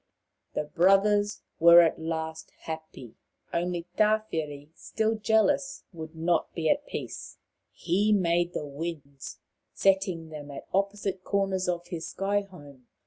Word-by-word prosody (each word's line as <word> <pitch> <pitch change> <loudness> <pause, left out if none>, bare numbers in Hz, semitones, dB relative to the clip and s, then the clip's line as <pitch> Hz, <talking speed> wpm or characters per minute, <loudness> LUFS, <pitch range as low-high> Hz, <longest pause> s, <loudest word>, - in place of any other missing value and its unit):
The - - 0
brothers 195 +5 +3 0.2
were 170 +1 +9
at 165 - +2
last 160 0 -4
happy. 160 -7 -8 0.4
Only 175 0 -1
Tawhiri, 160 -10 0
still 220 +5 -1
jealous, 225 +6 +1
would 160 -1 -8
not 165 +1 0
be 160 -2 +2
at 290 0 -1
peace. - - -6 0.3
He 200 +5 +1
made 175 -3 +2
the 150 - -3
winds, 145 -2 -7 0.4
setting 190 -4 +1
them 150 -2 -8
at 140 - -8
opposite 195 -1 -1
corners 190 -2 0
of 175 0 -3
his 165 -2 -5
sky 200 +1 0
home. 145 -10 -14
175 Hz, 130 wpm, -28 LUFS, 160-200 Hz, 0.4 s, were